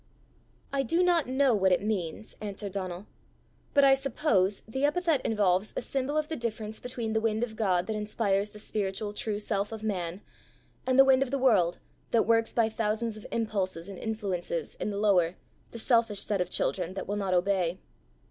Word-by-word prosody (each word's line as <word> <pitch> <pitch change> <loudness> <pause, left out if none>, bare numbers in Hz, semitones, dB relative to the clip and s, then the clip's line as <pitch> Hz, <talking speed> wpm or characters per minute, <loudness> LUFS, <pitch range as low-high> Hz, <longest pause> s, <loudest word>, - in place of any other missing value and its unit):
"I 275 - +2
do 330 +8 +2
not 345 -5 +3
know 260 0 +3
what 190 -3 +3
it 180 - +2
means," 205 -1 -3
answered 205 -1 -5
Donal; 185 -1 -5 0.7
"but 280 - +6
I 270 -1 +7
suppose 270 -8 +1
the 265 +5 -3
epithet 315 -1 +2
involves 200 -2 +1
a - - -1
symbol 275 +2 -1
of 305 -1 0
the 320 - -3
difference 220 -3 -4
between 235 -3 -4
the 220 - +1
wind 220 0 0
of 225 -2 -4
God 185 -5 +1
that 220 - -3
inspires 210 -1 0
the 210 - -13
spiritual 205 0 -3
true 210 0 -2
self 205 -1 -2
of 220 -1 -7
man, 185 -3 -3 0.7
and 255 0 +3
the 270 - +9
wind 265 -1 +5
of 270 - +1
the 275 - 0
world 200 -10 +3 0.3
that 230 - +3
works 225 0 +3
by 230 -2 +2
thousands 220 0 -1
of 215 - -10
impulses 195 -6 -2
and 195 -2 -8
influences 190 -7 -3
in - - -4
the 200 - -3
lower, 185 -5 +3 0.3
the - - -9
selfish 225 -3 +2
self 205 -3 +2
of 180 - -1
children 180 0 -1
that 195 - -4
will 205 - -1
not 195 -2 0
obey. 180 -1 +1
215 Hz, 195 wpm, -29 LUFS, 195-235 Hz, 0.7 s, the